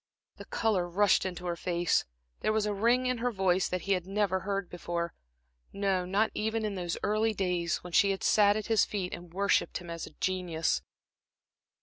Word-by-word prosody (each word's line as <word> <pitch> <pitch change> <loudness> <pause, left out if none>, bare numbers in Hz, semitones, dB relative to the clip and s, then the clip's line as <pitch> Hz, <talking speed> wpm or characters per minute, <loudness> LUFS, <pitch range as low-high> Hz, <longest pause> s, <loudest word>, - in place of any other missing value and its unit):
The - - -9
color 195 -6 0
rushed 195 +1 +3
into 180 -1 -6
her 175 -1 -1
face, 175 -1 +1 0.3
there - - +1
was 215 -1 +1
a 210 - 0
ring 235 +5 +2
in 250 -1 0
her 245 +1 0
voice 190 -3 +1
that 180 -1 -2
he 195 -2 +1
never 190 +1 0
heard 195 0 -2
before 170 -1 -4 0.6
no, 195 -2 0
not 200 +4 +1
even 220 +1 -1
in 210 - -2
those 175 -3 -3
early 215 +1 +1
days, 180 -3 0
when 175 -1 -9
she 200 - +5
had 195 -1 -2
sat 205 -1 +4
at 215 - -3
his 225 -2 +3
feet, 190 -4 -3
and 175 -1 -8
worshipped 200 +3 +1
him 175 -1 -8
as 165 -1 -5
a - - -15
genius. 180 -4 0
190 Hz, 195 wpm, -30 LUFS, 175-210 Hz, 0.6 s, she